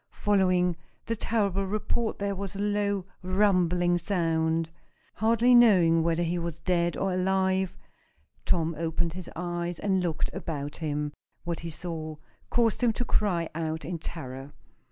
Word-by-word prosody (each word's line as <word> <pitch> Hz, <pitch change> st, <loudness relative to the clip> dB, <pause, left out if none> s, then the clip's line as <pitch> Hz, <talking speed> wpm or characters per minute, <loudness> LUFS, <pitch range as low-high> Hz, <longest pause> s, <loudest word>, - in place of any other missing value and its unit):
Following 185 Hz, -4 st, +2 dB, 0.3 s
the 230 Hz, -, -1 dB
terrible 200 Hz, -3 st, 0 dB
report 215 Hz, +3 st, -1 dB
there 200 Hz, 0 st, -1 dB
was 195 Hz, -1 st, -5 dB
a -, -, -5 dB
low, 205 Hz, -2 st, 0 dB, 0.2 s
rumbling 180 Hz, -2 st, +2 dB
sound. 165 Hz, -3 st, 0 dB, 0.4 s
Hardly 230 Hz, +3 st, +3 dB
knowing 185 Hz, -9 st, +6 dB
whether 165 Hz, +1 st, +1 dB
he 175 Hz, +1 st, -1 dB
was 170 Hz, -1 st, -4 dB
dead 175 Hz, -2 st, +1 dB
or 195 Hz, -1 st, 0 dB
alive, 190 Hz, 0 st, +1 dB, 0.7 s
Tom 165 Hz, -2 st, +1 dB
opened 165 Hz, 0 st, -1 dB
his 185 Hz, 0 st, -7 dB
eyes 175 Hz, 0 st, -3 dB
and 190 Hz, 0 st, +1 dB
looked 170 Hz, -3 st, -1 dB
about 150 Hz, -6 st, -4 dB
him. 150 Hz, -2 st, -2 dB, 0.3 s
What 170 Hz, 0 st, -3 dB
he 170 Hz, -, -5 dB
saw 160 Hz, -1 st, -5 dB, 0.3 s
caused 230 Hz, -1 st, +2 dB
him 240 Hz, -2 st, +3 dB
to 245 Hz, -, -2 dB
cry 180 Hz, -7 st, +1 dB
out 160 Hz, 0 st, -3 dB
in 170 Hz, 0 st, -4 dB
terror. 135 Hz, -4 st, -7 dB
175 Hz, 145 wpm, -28 LUFS, 165-200 Hz, 0.7 s, knowing